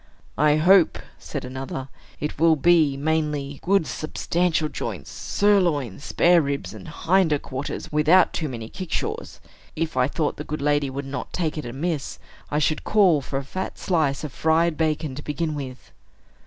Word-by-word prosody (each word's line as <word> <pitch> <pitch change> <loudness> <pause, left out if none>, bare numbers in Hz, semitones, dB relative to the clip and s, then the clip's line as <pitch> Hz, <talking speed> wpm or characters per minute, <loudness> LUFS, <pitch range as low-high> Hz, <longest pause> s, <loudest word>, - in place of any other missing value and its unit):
"I 150 0 +5
hope," 175 +3 +5 0.2
said - - -6
another, 130 +1 -5 0.3
"it 150 -1 -4
will 165 0 +5
be, 155 -3 +4
mainly, 150 -2 -1
good 195 -2 +2
substantial 165 +1 -1
joints, - - -6
sirloins, 170 - +1
spareribs, 160 -5 +2
and - - -10
hinder 165 0 +2
quarters, 135 0 -6
without 155 +4 +4
too 155 - -2
many 115 -3 -6
kickshaws. 430 - -4 0.4
If 165 -2 -2
I 130 0 +3
thought 150 +1 -2
the 150 - -5
good 150 0 -4
lady 145 -1 +1
would 140 +1 -5
not 140 +1 -5
take 160 -4 -1
it 150 - -5
amiss, 145 +4 -3 0.3
I 150 - -1
should 155 0 +1
call 185 -8 +4
for 135 +1 -4
a 135 - -3
fat 185 +8 -5
slice 155 -7 0
of 150 -4 -5
fried 160 +1 +2
bacon 155 -2 -1
to 140 - -7
begin 155 +2 -2
with." 130 -3 -7
155 Hz, 160 wpm, -24 LUFS, 140-170 Hz, 0.4 s, I